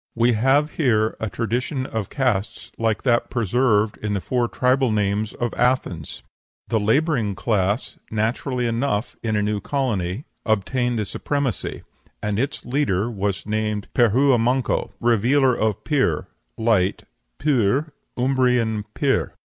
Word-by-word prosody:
We 120 +1 +3
have 135 +7 +3
here 110 -7 +2
a 110 - -2
tradition 125 +5 -2
of 110 -6 -4
castes 125 -8 -1
like 110 -2 0
that 120 -3 +2
preserved 115 -2 +1
in 105 -1 -2
the 100 - 0
four 120 +4 0
tribal 130 0 +2
names 105 +1 0
of 120 -2 -2
Athens." 120 - -1 0.5
The 110 - +2
laboring 115 - +1
class 100 +1 -1
(naturally 120 +4 -1
enough 115 -2 -1
in 110 -2 -1
a 105 - +1
new 105 0 -1
colony) 110 -4 -2 0.2
obtained 120 +3 0
the 105 - -1
supremacy, 135 0 -3 0.4
and 105 0 -2
its 135 +3 -2
leader 120 -5 0
was 100 -2 -2
named 105 -1 -2
Pirhua 125 +2 +4
manco, 125 +3 +1
revealer 120 +3 +3
of 110 -3 -1
Pir, 135 - +1 0.3
light 110 -5 +1 0.3
(p[~u]r, 140 +1 +1 0.2
Umbrian 125 -4 +1
pir). - - +1
115 Hz, 130 wpm, -22 LUFS, 105-130 Hz, 0.5 s, Pirhua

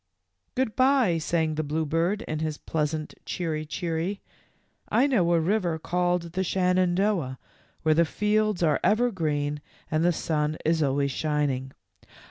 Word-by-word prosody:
" - - -50
Good 255 -4 0
by," 255 -10 +3
sang 160 0 0
the 155 +1 -2
bluebird, 165 +7 0
in 155 - -4
his 155 -2 -2
pleas 150 -2 -1
ant 155 -1 -6
" - - -42
cheery, 155 -3 -3
cheery." 170 +4 -2 0.7
"I 255 - +4
know 205 -12 +2
a 170 - +4
river 175 -1 0
called 175 +1 -1
the 190 +1 0
Shenandoah 180 -5 +1 0.5
where 155 0 +4
the 165 +2 +4
fields 210 +1 +1
are 155 -3 +3
ever 225 +6 +3
green 150 -5 -1 0.3
and 155 +1 +2
the 175 - +4
sun 155 -2 -1
is 160 0 +2
always 140 -1 +1
shining. 140 -3 -1
165 Hz, 155 wpm, -26 LUFS, 155-190 Hz, 0.7 s, I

